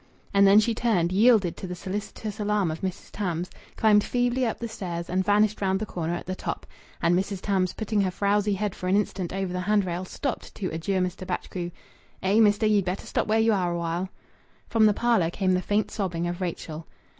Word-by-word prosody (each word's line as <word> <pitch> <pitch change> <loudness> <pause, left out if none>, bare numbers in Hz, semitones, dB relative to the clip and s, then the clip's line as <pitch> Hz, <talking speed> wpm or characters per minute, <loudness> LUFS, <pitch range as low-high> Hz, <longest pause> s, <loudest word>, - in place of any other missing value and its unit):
And 200 0 +6
then 200 +2 +8
she 225 +2 +2
turned, 210 -7 +1
yielded 205 -3 +4
to 190 - -6
the 180 - -5
solicitous 205 +3 -5
alarm 205 -4 +1
of 160 - -6
Mrs. 190 0 -5
Tams, 180 -3 -3 0.3
climbed 210 -2 +5
feebly 245 0 +1
up 225 - -2
the 235 - -4
stairs, 175 -6 -5
and 185 +1 +1
vanished 210 +1 +2
round 190 -1 +1
the 215 - -2
corner 170 -3 -3
at - - -6
the 185 - -3
top. - - -4 0.4
And 170 +1 +4
Mrs. 195 +1 -1
Tams, 185 -2 0
putting 215 -1 0
her 190 - +1
frowsy 205 +2 +1
head 205 0 -2
for 180 - -6
an 185 - +3
instant 190 -3 -1
over 190 -1 -2
the 180 - -2
hand 205 +1 +2
rail, 175 0 -3
stopped 250 +7 -4
to 190 - -3
adjure 185 +4 -1
Mr. 180 +1 -3
Batchgrew 180 -1 -3 0.5
"Eh, 195 +3 +3
mester; 210 0 +4
ye'd 210 -2 +3
better 180 +2 -3
stop - - -1
where 215 +1 +3
ye 225 0 +4
are 185 -4 +1
awhile." 170 +2 -2 0.6
From 220 -2 +4
the 210 - +3
parlour 230 -9 +2
came 185 +1 0
the 180 - +1
faint 205 +3 0
sobbing 175 -5 -2
of 175 +2 -4
Rachel. 165 -2 -5
195 Hz, 215 wpm, -26 LUFS, 180-210 Hz, 0.6 s, then